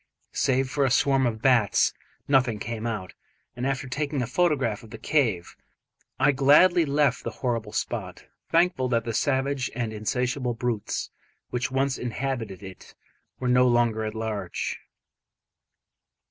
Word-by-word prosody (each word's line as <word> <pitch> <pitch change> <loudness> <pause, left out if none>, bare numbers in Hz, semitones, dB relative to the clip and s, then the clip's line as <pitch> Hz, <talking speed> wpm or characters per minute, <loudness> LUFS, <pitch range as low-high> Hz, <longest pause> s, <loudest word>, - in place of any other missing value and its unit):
Save 130 0 +1
for 140 +2 0
a 135 - +3
swarm 135 +1 +3
of 110 -1 -4
bats, 120 -6 +3 0.3
nothing 130 -5 +3
came 115 +1 -4
out; 105 -5 -4 0.4
and 125 +1 -2
after 135 0 -2
taking 140 0 -2
a - - -1
photograph 135 - +1
of 115 - -14
the 115 - -8
cave, 115 - 0 0.6
I 140 +3 +5
gladly 150 +6 +5
left 140 -2 +1
the - - -2 0.2
horrible 115 -3 -1
spot, - - -4 0.2
thankful 165 -6 +2
that 115 -2 +1
the 115 - -3
savage 135 +1 0
and 115 -3 -2
insatiable 125 +3 -1
brutes 115 -2 -3 0.4
which 125 +2 -1
once 135 0 0
inhabited 120 -5 -4
it 95 -1 -12 0.4
were 130 - -2
no 125 0 +5
longer 120 -2 +2
at 110 0 -4
large. 110 -5 -3
125 Hz, 145 wpm, -26 LUFS, 110-135 Hz, 0.6 s, I